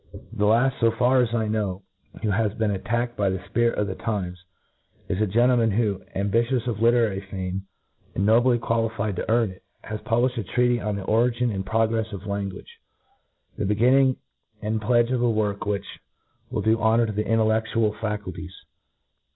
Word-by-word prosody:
The 105 -2 +1
laft, 120 +5 +3
fo 115 - +4
far 125 +3 +3
as 120 -2 0
I 115 -2 0
know, 100 -3 -2 0.4
who 110 - +1
has 105 +1 +1
been 110 -2 0
attacked 120 +5 -2
by 100 -2 +1
the 95 - -1
fpirit 115 +5 0
of 105 - 0
the 95 - -3
times, 95 -5 -4 0.6
is 95 - -1
a 110 - +2
gentleman 120 +2 +3
who, 105 -2 0
ambitious 115 +5 +1
of 115 -3 -3
literary 115 -4 +3
fame, 95 0 -4 0.5
and 100 - 0
nobly 120 +3 +4
qualified 115 -3 -1
to - - -4
earn 115 -3 +2
it, 95 - -15 0.2
has 110 0 -5
publiflied 120 +2 +1
a - - -2
treatife 120 +4 +1
on 105 - -1
the 100 - -5
Ori 115 +5 +3
gin 120 0 0
AND 95 -1 -4
Progress 110 +1 0
of 100 0 -7
Language, 100 -2 -5 0.8
the - - 0
begin 110 +6 +3
ning 135 -1 +4 0.4
and 110 +1 -2
pledge 120 +2 +2
of 125 -2 0
a 120 - +3
work 105 -2 -1
which 100 -1 -1 0.6
will - - -2
do 110 +1 +3
honour 115 +2 +3
to 110 - -3
the 105 +1 -1
intelleOiual 110 0 +1
faculties. 100 -3 -5
110 Hz, 185 wpm, -24 LUFS, 100-120 Hz, 0.8 s, fo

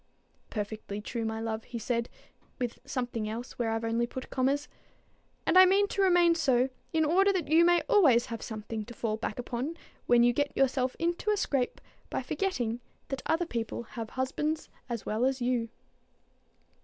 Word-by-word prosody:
"Perfectly 210 -1 -4
true, 225 +2 -4
my 220 0 -2
love," 225 0 -3
he 240 - -7
said, 235 +1 -1 0.5
with 245 -2 -3
something 240 -4 -3
else 235 +4 -6
where 235 -2 +1
I've 225 0 -1
only 230 +1 +1
put 260 +1 -7
commas; 275 +3 +1 0.8
"and 370 - +6
I 375 - +10
mean 400 +2 +4
to 395 - -1
remain 350 -3 +5
so, 265 -6 +2 0.2
in 320 -1 +2
order 385 +6 +4
that 355 -7 -2
you 325 +2 +6
may 345 0 +5
always 265 - +5
have 230 -1 -6
something 220 0 -5
to 240 +1 -10
fall 220 -2 -1
back 220 -1 -4
upon 250 +6 -3 0.3
when 240 -1 +6
you 240 0 +5
get 285 +2 -1
yourself 260 -1 +2
into 345 +5 -1
a 420 - +3
scrape 275 -9 0 0.3
by - - -2
forgetting 250 - -1 0.3
that 270 -1 -3
other 330 +2 +2
people 235 -5 -3
have 225 -1 -7
husbands 300 +4 -2 0.2
as 235 -3 -4
well 215 +3 -1
as 265 +1 +2
you." 240 -2 0
250 Hz, 180 wpm, -30 LUFS, 230-315 Hz, 0.8 s, I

